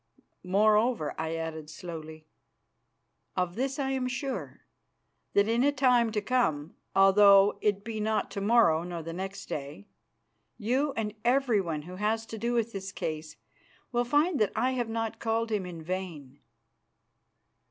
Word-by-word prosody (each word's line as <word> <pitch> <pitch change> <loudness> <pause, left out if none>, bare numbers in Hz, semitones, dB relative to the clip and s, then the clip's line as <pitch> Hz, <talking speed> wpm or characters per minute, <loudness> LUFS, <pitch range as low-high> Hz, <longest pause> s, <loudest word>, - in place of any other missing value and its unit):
Moreover," 210 -1 +2
I 160 +1 -3
added 160 -2 -5
slowly, 160 -1 -8 1.1
"of 180 -1 0
this 265 +5 -2
I 270 -2 -1
am 260 -1 -1
sure, 265 +2 -4 0.7
that 200 +1 +4
in 230 +2 +2
a 285 - +4
time 250 -4 +3
to 210 - 0
come, 170 - 0 0.2
although 195 +1 +6
it 205 -1 +1
be 220 -1 -5
not 215 +1 -1
to 200 - -4
morrow 200 -7 +4
or 170 -2 -5
the 165 +1 -6
next 190 +3 -5
day, 145 +6 -6 0.7
you 255 +6 0
and 215 -4 -3
everyone 220 - +1
who 180 +3 -9
has 220 +2 0
to 225 -1 -8
do 235 +2 -1
with 230 -1 0
this 195 -1 -6
case 155 -4 -5 0.6
will 240 -1 +1
find 290 +6 +2
that 215 - +2
I 255 - +1
have 245 -3 -2
not 225 0 -3
called 225 0 -1
Him 200 -4 -1
in 170 -3 -8
vain." 160 -6 -5
210 Hz, 155 wpm, -29 LUFS, 170-240 Hz, 1.1 s, although